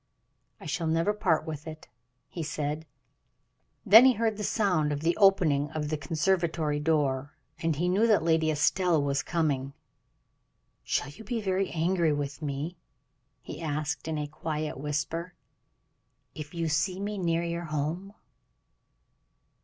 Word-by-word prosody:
"I - - -12
shall 160 +2 -2
never 165 +5 +2
part 165 -7 +1
with 155 0 -6
it," 155 0 -9 0.4
he 170 - -6
said. 150 0 -3 1.0
Then 220 +3 +9
he 260 - +6
heard 225 -1 0
the 210 - -5
sound 180 -9 +1
of 145 0 -2
the 170 +2 +1
opening 175 -8 +4
of 150 -1 -2
the 155 - 0
conservatory 160 0 0
door, 145 -3 0 0.2
and 165 -1 0
he 170 +5 0
knew 200 +6 +3
that 215 -6 +4
Lady 160 -1 +2
Estelle 165 +2 +2
was 140 -1 0
coming. 140 -5 -1 1.1
"Shall - - -1
you 200 +10 -12
be 230 +2 -2
very 195 -2 0
angry 170 -1 +1
with 145 +1 -4
me," 150 +4 -4 0.7
he - - -8
asked, 150 -1 -3
in 160 -1 -2
a 150 - -2
quiet 155 -1 -4
whisper, 160 +4 -3 1.0
"if 150 -1 -8
you 165 -1 -1
see 175 +5 0
me 205 0 -3
near 170 -1 +1
your 170 0 -3
home." 160 +6 -3
160 Hz, 145 wpm, -28 LUFS, 150-180 Hz, 1.1 s, Then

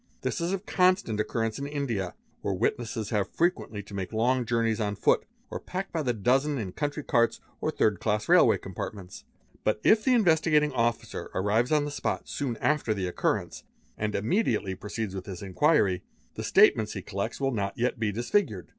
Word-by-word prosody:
This - - -2
is 170 +2 0
of 195 +1 -3
constant 180 - +2
occurrence 115 +1 -1
in 140 - -3
India 120 -11 -3 0.3
where 100 - -1
witnesses 110 0 -2
have 105 -3 0
frequently 165 - -1
to 105 - -13
make 95 -2 -4
long 120 +2 +1
journeys 115 -2 +1
on 105 -1 -1
foot - - +2 0.3
or - - -4
packed 190 +1 -5
by 165 - 0
the 130 -4 +1
dozen 135 +7 +1
in 100 -7 -4
country 145 - -3
carts 115 -2 +2 0.2
or - - -1
third 105 -4 +1
class 105 -1 -1
railway - - +6
compartinents. 95 -3 -7 0.4
But 110 - +1
if 215 0 +5
the 260 -1 +4
In 230 - +4
vestigating 155 -3 +3
Officer 115 -2 -1
arrives 110 +7 +1
on 150 -1 +3
the 145 - -4
spot - - -3
soon 130 -5 -3
.after 135 -3 +1
the 95 -2 -2
occurrence 90 - -2 0.3
and 105 -1 -2
immediately 110 - 0
proceeds 105 +1 -5
with 95 -2 -6
his 95 -1 -7
inquiry, 100 - +2 0.3
the - - -6
statements 110 -1 +4
he 95 - -6
collects 100 +3 -4
will 135 -1 +1
not 100 -3 -2
yet 120 0 0
be 110 -2 0
disfigured. 120 - -1
115 Hz, 190 wpm, -28 LUFS, 105-145 Hz, 0.4 s, railway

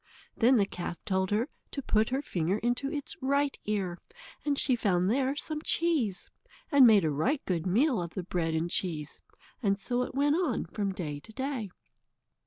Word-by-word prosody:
Then 250 +2 +5
the 200 - +4
calf 175 -2 -5
told 190 -2 0
her 215 +5 +1 0.2
to 280 - -4
put 215 -1 +2
her 265 +3 -1
finger 175 - 0
into 245 +5 -1
its 290 -3 -5
right 280 +1 +1
ear, 195 -4 -2 0.4
and 285 -1 0
she 260 - +3
found 190 -4 +1
there 265 +2 +1
some 305 +1 -4
cheese, 305 - 0 0.4
and 280 -4 +8
made 205 -6 +6
a 155 - +1
right 225 - +1
good 175 -2 -1
meal 240 - +3
of 170 -1 -6
the 185 - -3
bread 165 -2 -1
and 160 +1 0
cheese. 155 -5 -2 0.4
And 200 -4 +2
so 245 +4 -1
it 250 - -4
went 290 +3 +3
on 320 -11 0
from 200 +3 -2
day 155 -6 -4
to 185 - -14
day. 260 -3 -3
215 Hz, 190 wpm, -29 LUFS, 180-270 Hz, 0.4 s, and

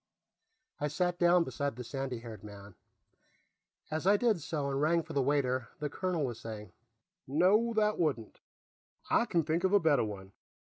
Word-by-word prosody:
I 150 - 0
sat 175 +4 -1
down 175 0 +5
beside 140 -5 -3
the 125 - -6
sandy 135 -2 -4
haired 110 -4 -9
man; 100 -1 -11 1.2
as 160 +3 -2
I 205 +1 +6
did 220 -6 +1
so 145 -2 -3
and 135 +1 -1
rang 165 +2 +2
for - - -9
the 140 - +2
waiter, 130 -3 +1
the 150 -2 -4
colonel 180 -4 -1
was 120 -3 -5
saying: 110 -2 -8 0.6
"No, 190 - +3
that 215 -1 +2
wouldn't. 140 -10 -1 0.7
I 235 - +4
can 170 -7 +1
think 160 +3 -1
of 190 +1 +2
a 205 - +7
better 160 -7 +3
one. 100 -3 -7
150 Hz, 175 wpm, -31 LUFS, 125-175 Hz, 1.2 s, a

